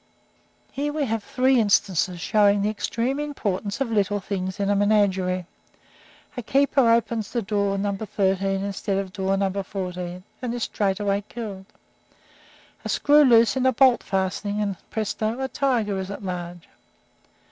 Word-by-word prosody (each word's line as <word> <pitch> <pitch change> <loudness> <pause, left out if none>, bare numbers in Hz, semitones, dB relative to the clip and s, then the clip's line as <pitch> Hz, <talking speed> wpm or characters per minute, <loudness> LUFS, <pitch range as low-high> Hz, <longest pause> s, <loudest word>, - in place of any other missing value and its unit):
Here 290 +2 -2
we 295 -1 -1
have 225 -3 -2
three 255 +2 +2
instances 190 -4 +2
showing 205 +2 +3
the 210 - +1
extreme 240 +5 -2
importance 210 -9 -3
of 265 -4 -1
little 205 -1 +1
things 190 0 -4
in 200 0 +1
a - - +2
menagerie. 195 -3 +2 0.9
A 245 - -4
keeper 270 +1 +3
opens 230 -2 +1
door 200 -3 0
No. 200 0 -1
13 195 -1 -1
instead 200 0 -2
of 195 -1 -4
door 195 -1 0
No. 195 -1 0
14, 180 -2 -5 0.2
and 245 -2 -3
is 240 - -3
straightway 200 0 -1
killed. 200 -5 -7 1.2
A - - -5
screw 295 +1 +4
is 290 - +6
loose 230 -3 +5
in 260 0 +2
a - - +5
bolt 255 0 +5
fastening, 195 +2 -2
and, 200 -2 -1
presto! 220 +2 -2
a 265 - -1
tiger 240 -8 0
is 190 0 -5
at 200 +1 -7
large. 175 -2 -6
205 Hz, 155 wpm, -24 LUFS, 195-230 Hz, 1.2 s, is